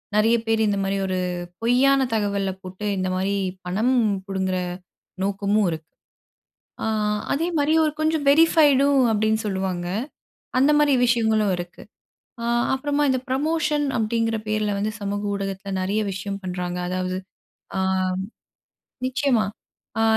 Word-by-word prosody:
நெறைய 220 Hz, +2 st, +4 dB
பேரு 225 Hz, 0 st, +2 dB
இந்தமாரி 195 Hz, -1 st, 0 dB
ஒரு 185 Hz, -1 st, -1 dB, 0.4 s
பொய்யான 260 Hz, +4 st, +4 dB
தகவல 200 Hz, -3 st, 0 dB
போட்டு, 185 Hz, +2 st, -7 dB
இந்தமாரி 185 Hz, +1 st, 0 dB, 0.3 s
பணம் 215 Hz, +8 st, +1 dB, 0.3 s
புடுங்குற 190 Hz, -1 st, -1 dB, 0.7 s
நோக்கமும் 200 Hz, +1 st, +1 dB
இருக்கு. 160 Hz, 0 st, -7 dB, 0.9 s
ஆ -, -, 0 dB, 0.5 s
அதேமாரி 315 Hz, -1 st, +1 dB
ஒரு 305 Hz, -, +1 dB
கொஞ்சம் 310 Hz, -1 st, +1 dB
வெரிஃபைடும் 285 Hz, -3 st, +5 dB
அப்பிடின்னு 220 Hz, +1 st, +1 dB
சொல்லுவாங்க. 190 Hz, -3 st, -2 dB, 0.7 s
அந்தமாரி 295 Hz, +1 st, +4 dB
விஷயங்களும் 220 Hz, -4 st, +2 dB
இருக்கு. 175 Hz, 0 st, -8 dB, 0.6 s
ஆ -, -, -3 dB, 0.3 s
அப்புறமா 290 Hz, +2 st, 0 dB
இந்த 260 Hz, -1 st, +2 dB
ப்ரமோஷன் 300 Hz, +2 st, +1 dB
அப்டிங்கிற 225 Hz, 0 st, 0 dB
பேர்ல 215 Hz, -1 st, 0 dB
வந்து, 215 Hz, +2 st, -1 dB
சமூக 205 Hz, 0 st, -2 dB
ஊடகத்தில 195 Hz, 0 st, -4 dB
நெறைய 200 Hz, +3 st, 0 dB
விஷயம் 195 Hz, +1 st, -5 dB
பண்றாங்க. 180 Hz, -1 st, -3 dB
அதாவது 185 Hz, 0 st, -2 dB, 0.6 s
ஆ -, -, +1 dB, 1.3 s
நிச்சயமா! 260 Hz, -3 st, +1 dB, 0.5 s
ஆ -, -, +3 dB
215 Hz, 115 wpm, -23 LUFS, 195-265 Hz, 1.3 s, வெரிஃபைடும்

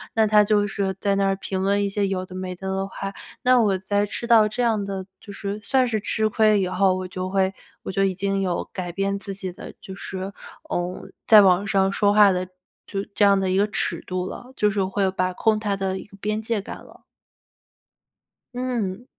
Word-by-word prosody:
那 220 Hz, -1 st, +4 dB
他 210 Hz, 0 st, +6 dB
就 205 Hz, -1 st, +2 dB
是 195 Hz, -2 st, -2 dB
在 200 Hz, -1 st, +1 dB
那 195 Hz, 0 st, +2 dB
儿 195 Hz, -, +1 dB
评 190 Hz, -1 st, -3 dB
论 200 Hz, +1 st, +2 dB
一 -, -, 0 dB
些 200 Hz, 0 st, 0 dB
有 185 Hz, -1 st, -2 dB
的 185 Hz, -, -11 dB
没 185 Hz, 0 st, -4 dB
的 190 Hz, +2 st, -8 dB
的 195 Hz, 0 st, -1 dB
话， 195 Hz, 0 st, -6 dB, 0.3 s
那 250 Hz, -1 st, +5 dB
我 200 Hz, -3 st, +2 dB
在 205 Hz, +2 st, 0 dB
吃 235 Hz, +3 st, -5 dB
到 220 Hz, -3 st, +6 dB
这 245 Hz, +4 st, -3 dB
样 220 Hz, -3 st, +1 dB
的 195 Hz, -1 st, -4 dB, 0.2 s
就 205 Hz, -, -10 dB
是 200 Hz, +1 st, -5 dB
算 260 Hz, +3 st, +2 dB
是 220 Hz, -3 st, -1 dB
吃 215 Hz, +1 st, 0 dB
亏 215 Hz, -1 st, +3 dB
以 185 Hz, -, 0 dB
后， 185 Hz, +1 st, +2 dB
我 185 Hz, 0 st, -4 dB
就 185 Hz, 0 st, -4 dB
会 190 Hz, 0 st, +1 dB, 0.3 s
我 -, -, -4 dB
就 195 Hz, -, +2 dB
已 195 Hz, -1 st, +2 dB
经 195 Hz, +1 st, -1 dB
有 180 Hz, -2 st, -2 dB
改 180 Hz, -2 st, -4 dB
变 195 Hz, +2 st, -1 dB
自 200 Hz, 0 st, -5 dB
己 190 Hz, -2 st, -6 dB
的， -, -, -10 dB
就 190 Hz, -, -9 dB
是， 190 Hz, 0 st, -6 dB, 0.4 s
嗯 175 Hz, -4 st, -3 dB, 0.2 s
在 215 Hz, -, +9 dB
网 190 Hz, 0 st, +4 dB
上 195 Hz, -2 st, +2 dB
说 205 Hz, 0 st, +2 dB
话 205 Hz, -2 st, +7 dB
的 185 Hz, 0 st, -2 dB, 0.4 s
就 195 Hz, -1 st, -3 dB
这 210 Hz, -, +3 dB
样 200 Hz, -1 st, +5 dB
的 190 Hz, -1 st, 0 dB
一 185 Hz, -, +1 dB
个 200 Hz, -, +4 dB
尺 -, -, -2 dB
度 185 Hz, 0 st, -3 dB
了， 250 Hz, +6 st, -9 dB
就 210 Hz, -, +3 dB
是 200 Hz, -1 st, 0 dB
会 190 Hz, +1 st, 0 dB
把 185 Hz, -1 st, -1 dB
控 215 Hz, +4 st, +2 dB
它 210 Hz, -2 st, -1 dB
的 190 Hz, -1 st, -2 dB
一 -, -, -8 dB
个 200 Hz, -1 st, -17 dB
边 215 Hz, +2 st, -2 dB
界 220 Hz, -2 st, -1 dB
感 -, -, -8 dB
了。 -, -, -18 dB, 1.5 s
嗯。 245 Hz, -4 st, -3 dB
195 Hz, 245 characters per minute, -23 LUFS, 190-210 Hz, 1.5 s, 在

